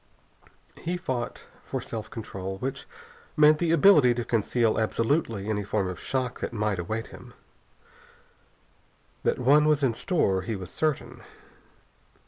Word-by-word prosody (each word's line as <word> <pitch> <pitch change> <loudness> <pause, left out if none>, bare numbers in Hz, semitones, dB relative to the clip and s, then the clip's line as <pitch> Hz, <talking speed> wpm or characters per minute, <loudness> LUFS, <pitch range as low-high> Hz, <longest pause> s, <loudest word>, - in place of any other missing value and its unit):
He 175 +2 -3
fought 130 -9 -4 0.2
for - - -4
self 110 -2 -6
control, 95 -4 -6
which 130 +6 -5 0.5
meant 150 0 +6
the 170 - 0
ability 150 -7 +6
to 120 -1 -3
conceal 115 0 +1
absolutely 115 -1 0
any 105 -1 -1
form 100 -1 -1
of 90 -3 -5
shock 130 -2 -2
that - - -3
might 105 -4 -1
await 110 +6 -4
him. - - -13 1.9
That - - +1
one 145 +4 +4
was 150 -2 +2
in 125 -4 +3
store 105 - 0
he 110 +4 -3
was 95 -2 -7
certain. 155 -3 -2
115 Hz, 135 wpm, -27 LUFS, 105-145 Hz, 1.9 s, meant